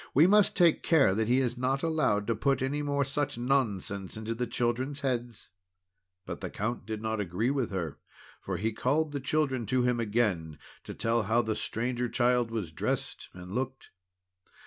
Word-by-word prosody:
We 150 +5 +7
must 205 +2 +5
take 170 -3 +4
care 145 - +4
that 110 +2 0
he 125 +2 +4
is 125 -1 -1
not 135 +3 0
allowed 155 -11 +1
to 115 - 0
put 135 +3 +1
any 145 +3 -1
more 140 -1 0
such 145 -1 -2
nonsense 110 -7 -1
into 110 +1 -3
the 120 +1 -2
children's 125 +4 -1
heads." 120 -4 -3 0.8
But - - -6
the - - -4
Count 110 0 -3
could 110 -1 -4
not 110 0 -1
agree 105 +6 0
with 135 -5 -1
her, 85 -6 -4 0.4
for 95 -2 -3
he 110 +4 -1
called 145 +7 +1
the 145 - -3
children 135 -4 0
to 130 +3 +2
him 125 -1 +1
again, 105 -9 0 0.3
to - - -7
tell 115 +2 +1
how 115 +3 +2
the 110 -1 -1
Stranger 120 +3 -2
Child 125 -1 +2
was 110 -8 -4
dressed - - -3
and 90 0 -9
looked. 130 +4 -4
120 Hz, 185 wpm, -29 LUFS, 110-135 Hz, 0.8 s, We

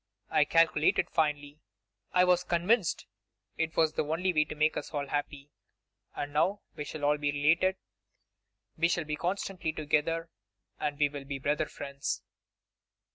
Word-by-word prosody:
I 150 - +4
calculated 160 -1 +3
finely; 150 -1 0 0.5
I 180 - +5
was 180 -1 +3
convinced 180 +3 +1 0.5
it 165 0 -2
was 160 -1 +3
the - - 0
only 170 +5 0
way 155 -1 +3
to 150 - -7
make 155 +1 +2
us - - -4
all 145 -1 -1
happy. 145 0 -3 0.6
And 145 0 -4
now 190 +7 +2
we 150 - -5
shall 150 0 -4
all 150 +1 +3
be 145 -1 +1
related; 165 +6 +3 1.0
we 170 - +4
shall 170 -1 0
be 150 0 -2
constantly 180 0 -2
together; 160 +2 0 0.5
and 145 -1 -2
we 145 -1 +4
will 140 -1 -8
be 140 0 -4
brother 145 +3 0
friends. 140 -1 -4
155 Hz, 155 wpm, -30 LUFS, 145-170 Hz, 1.0 s, I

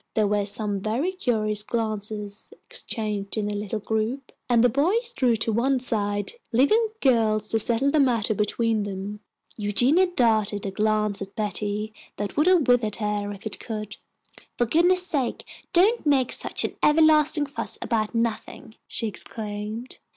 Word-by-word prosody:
There 215 - +3
were 205 0 0
some 205 0 +1
very 240 - -1
curious 215 - -1
glances 215 - -4
exchanged 215 - -3
in 210 -1 -1
the 210 - -3
little 205 +1 -3
group, 220 +5 -3 0.2
and 235 -1 +4
the - - +7
boys 380 - 0
drew 250 - +2
to 220 0 0
one 260 +4 +1
side, 205 -4 0 0.2
leaving 285 - +3 0.2
the - - +3
girls 215 -3 0
to 225 - +2
settle 235 +5 +4
the 310 - +2
matter 235 -5 +2
between 215 +2 0
them. 200 +1 -5 0.4
Eugenia 245 - +3
darted 220 - +1
a 195 - -3
glance 215 0 0
at 195 0 -7
Betty 210 0 -3 0.2
that 205 -1 -4
would 300 +4 +2
have 360 -7 +4
withered 235 -4 +2
her 210 -1 -2
if 200 +1 -10
it 220 - -2
could. 215 -1 -6 0.6
"For 240 - +2
goodness' 355 +8 +3
sake 280 -9 -2 0.3
don't 400 +7 +3
make 275 -4 +2
such - - -1
an - - -5
everlasting 305 -1 +4
fuss 280 - 0
about 220 0 -2
nothing," 230 -1 -3
she 230 - -2
exclaimed. 210 +3 -6
220 Hz, 160 wpm, -24 LUFS, 210-270 Hz, 0.6 s, the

